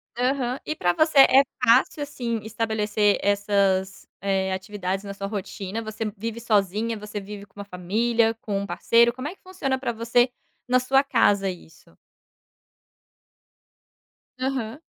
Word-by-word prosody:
Aham, 250 +1 0
e 310 - -3
para 175 - +1
você 310 - +3
é 270 0 +8 0.2
fácil 250 +5 +4
assim 245 -6 -3
estabelecer 215 -2 0
essas, 200 -2 +1
eh, 190 -1 0
atividades 190 0 -4
na 200 - -5
sua 195 0 -5
rotina? 200 +1 -5
Você 220 0 -5
vive 225 +2 -4
sozinha, 215 0 0
você 210 0 -6
vive 200 0 -9
com 205 0 -18
uma 200 - -6
família, 225 +5 +1
com 200 -2 -2
um 200 - -3
parceiro, 235 +3 +3
como 255 +3 -5
é 350 - -7
que - - -39
funciona 305 -8 -2
para 260 -2 -2
você 235 +2 +2 0.4
na 250 0 +4
sua 270 +2 +3
casa 205 -7 +2
isso? 170 -3 -12 2.4
Aham. 260 -1 -3
220 Hz, 145 wpm, -24 LUFS, 200-250 Hz, 2.4 s, é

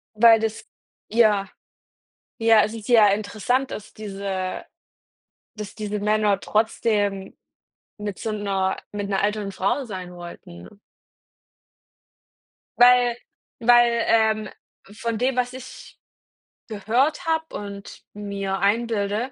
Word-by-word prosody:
Weil 225 +1 +7
das 220 0 -3 0.5
ja, 210 -4 +3 0.9
ja 225 -2 +5
si 225 +1 -8
sehr 210 -2 +5
interessant 225 +5 -1
dass, 210 - -8
diese 195 -3 -5 0.9
dass 210 -2 -7
diese 210 -1 -4
Männer 210 -1 +2
trotzdem 210 -3 0 0.6
mit 205 -2 -5
so 220 - -3
'ner 195 -2 -1
mit 205 -1 -4
'ner 195 -1 0
älteren 205 -1 -1
Frau 200 +9 -1
sein 185 -5 -7
wollten. 170 - -11 2.0
Weil 245 -1 +6 0.4
weil, 240 0 +4
ähm, 220 -2 +2 0.4
von 230 0 -3
dem, 255 +3 0
was 250 0 -1
ich 260 0 -11 0.7
gehört 235 - 0
habe 320 0 -1
und 200 -1 -8
mir 200 -2 -4
einbilde, 215 +2 0
215 Hz, 105 wpm, -23 LUFS, 200-230 Hz, 2.0 s, Weil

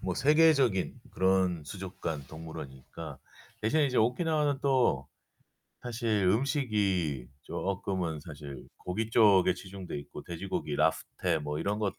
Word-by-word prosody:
뭐 90 -2 -2
세계적인 140 - +4
그런 95 -3 +2
수족관 85 -6 -5
동물원이니까. 80 -5 -8 0.4
대신에 145 +8 +3
이제 130 -2 -2
오키나와는 145 +4 +2
또 125 - +2 0.7
사실 115 -5 0
음식이 100 - +1
쪼끔은 90 -4 -2
사실 75 -3 -9
고기 110 +5 -3
쪽에 105 -5 +6
치중되어 95 -3 -7
있고, 70 - -9
돼지고기, 85 -4 -3
랍스터 85 -4 +1
뭐 75 0 -3
이런 100 +4 -1
것들 100 -3 -2
95 Hz, 295 characters per minute, -30 LUFS, 80-120 Hz, 0.7 s, 쪽에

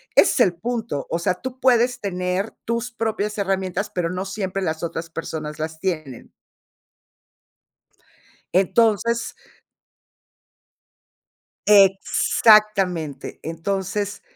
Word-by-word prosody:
es - - +5
el 180 -3 +4
punto, 225 - -3
o 165 - 0
sea, 180 +1 0
tú 260 +6 -7
puedes 245 -1 +3
tener 185 +1 -2
tus 235 +2 -2
propias 220 -2 -2
herramientas, 195 0 -1
pero, 175 -2 -1
no 180 +2 -3
siempre 195 -1 -3
las 160 -2 -2
otras 165 0 -5
personas 155 -2 -5
las 160 0 -4
tienen 155 -9 -4 2.2
entonces 225 +4 +2 2.3
Exactamente. 195 - +3
Entonces, 195 +5 -3
195 Hz, 90 wpm, -22 LUFS, 170-215 Hz, 2.3 s, es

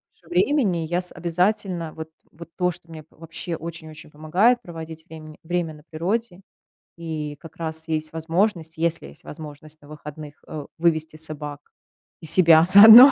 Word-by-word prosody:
меньше 170 - -26
времени, 190 - +2
я 175 +2 -1
с 180 - -2
обязательно 175 0 -1
вот 160 0 -8 0.2
вот 170 +1 -12
то, 180 -1 +1
что 170 0 -14
мне 155 -2 -10
вообще 165 +1 -5
очень-очень 160 -2 -9
помогает 190 +11 +2
проводить 160 -3 -9
врем 155 -1 -11
время 170 -1 -2
на 150 -1 -16
природе, 190 +4 -3 0.6
и 155 -3 -5
как 165 0 -13
раз 160 0 -3
есть 155 0 -1
возможность, 165 0 -1
если 165 0 -1
есть - - -15
возможность 155 0 -10
на 145 - -17
выходных, 150 0 -11
э, 150 -2 -7
вывести 160 -2 0
собак 150 -2 -1 0.6
и - - -10
себя 165 -1 +6
заодно 220 +8 +11
165 Hz, 155 wpm, -23 LUFS, 155-175 Hz, 0.6 s, заодно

